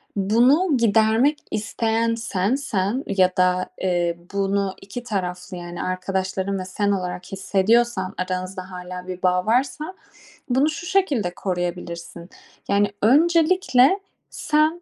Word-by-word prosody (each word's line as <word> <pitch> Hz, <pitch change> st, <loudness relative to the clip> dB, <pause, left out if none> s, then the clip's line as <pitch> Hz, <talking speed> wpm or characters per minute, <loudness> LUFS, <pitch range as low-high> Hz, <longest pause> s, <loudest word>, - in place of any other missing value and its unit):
bunu 250 Hz, -, +3 dB
gidermek 230 Hz, +5 st, +3 dB
isteyen 225 Hz, +1 st, 0 dB
sensen 225 Hz, +1 st, -1 dB
ya 185 Hz, -2 st, +2 dB
da, 180 Hz, 0 st, +2 dB
eee, 175 Hz, -2 st, 0 dB, 0.2 s
bunu 195 Hz, -1 st, 0 dB
2 200 Hz, +5 st, -7 dB
taraflı, 180 Hz, -4 st, -4 dB
yani 175 Hz, 0 st, -6 dB
arkadaşların 190 Hz, +1 st, -2 dB
ve 185 Hz, -, -5 dB
sen 200 Hz, +2 st, -1 dB
olarak 180 Hz, -2 st, -3 dB
hissediyorsan, 195 Hz, +1 st, +1 dB
aranızda 185 Hz, +1 st, -4 dB
hâlâ 180 Hz, 0 st, -7 dB
bir 185 Hz, 0 st, -6 dB
bağ 180 Hz, 0 st, +2 dB
varsa, 260 Hz, +9 st, 0 dB, 0.6 s
bunu 265 Hz, +5 st, +3 dB
şu 335 Hz, +3 st, -6 dB
şekilde 290 Hz, -, +1 dB
koruyabilirsin. 175 Hz, -2 st, -4 dB, 0.4 s
Yani 200 Hz, 0 st, +2 dB
öncelikle 325 Hz, -, +4 dB, 0.3 s
sen, 310 Hz, +3 st, +1 dB
200 Hz, 115 wpm, -22 LUFS, 185-245 Hz, 0.6 s, öncelikle